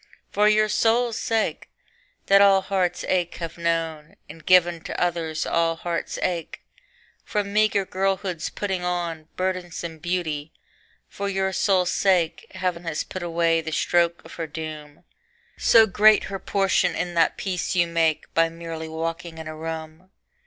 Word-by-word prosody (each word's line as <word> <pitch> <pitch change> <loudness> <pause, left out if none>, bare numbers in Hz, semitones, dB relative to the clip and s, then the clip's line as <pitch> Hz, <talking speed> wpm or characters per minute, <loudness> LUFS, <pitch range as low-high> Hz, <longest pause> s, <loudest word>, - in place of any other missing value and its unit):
For 210 +1 +4
your 215 0 +4
sole 230 +3 +2
sake 225 0 -1 0.6
that 195 0 +6
all 195 -1 +6
heart's 185 -2 -1
ache 175 -2 0
have 165 -2 -6
known, 165 -2 -2
And 165 - -12
given 175 -2 +4
to - - -4
others 165 -3 -1
all 165 0 +1
heart's 170 0 -4
ache, 175 -3 -3 0.6
From 200 -1 -2
meager 210 -2 +3
girlhood's 190 -2 -1
putting 190 -3 -3
on 170 -3 -3
Burdensome 175 -3 -3
beauty 160 -3 -3 0.5
for 200 0 -4
your 190 -1 -1
sole 190 -3 +2
sake 180 -2 +1
Heaven 180 -2 -2
has 165 -2 -2
put 185 - -7
away 165 -1 +1
the 160 - -6
stroke 170 +1 +1
of - - -12
her 165 - -3
doom, 155 -1 -8 0.5
So 225 -1 +6
great 215 +1 +5
her 195 - -3
portion 195 0 +1
in 175 -1 -2
that 165 -1 +2
peace 185 -1 -2
you 175 -1 +4
make 165 -2 0
By 165 0 +3
merely 165 -1 -7
walking 165 +1 -4
in 160 -1 -7
a 155 - -6
room. 160 +2 -7
175 Hz, 150 wpm, -24 LUFS, 165-190 Hz, 0.6 s, that